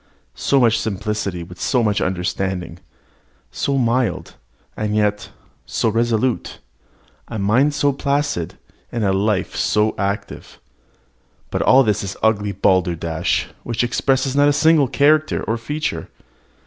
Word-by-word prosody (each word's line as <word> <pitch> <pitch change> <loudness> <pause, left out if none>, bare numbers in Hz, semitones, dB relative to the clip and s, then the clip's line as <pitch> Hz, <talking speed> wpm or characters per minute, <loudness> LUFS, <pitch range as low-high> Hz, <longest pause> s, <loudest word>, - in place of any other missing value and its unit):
So 140 - +1
much 115 -3 +3
simplicity 100 -3 -3
with 90 +1 -12
so 125 -3 +1
much 105 -2 +1
understanding 90 -1 -2 0.7
so 140 -1 -1
mild, 125 0 0 0.4
and 105 0 -2
yet 105 -1 0 0.4
so 115 - 0
resolute 115 +2 0 0.7
a - - -5
mind 120 +9 +2
so 145 0 +2
placid, 140 - -1 0.3
and 115 -2 -2
a 95 -1 +2
life 100 0 0
so 105 +1 +1
active. 100 +1 -4 0.9
But - - -1
all 135 +1 +6
this 105 -2 0
is 100 0 -5
ugly 105 -2 +2
balderdash, 85 -4 0
which 120 0 -2
expresses 130 +2 0
not 145 0 +5
a - - +3
single 150 -1 +4
character 150 +4 +2
nor 115 - 0
feature. 145 - -4
110 Hz, 130 wpm, -20 LUFS, 100-135 Hz, 0.9 s, all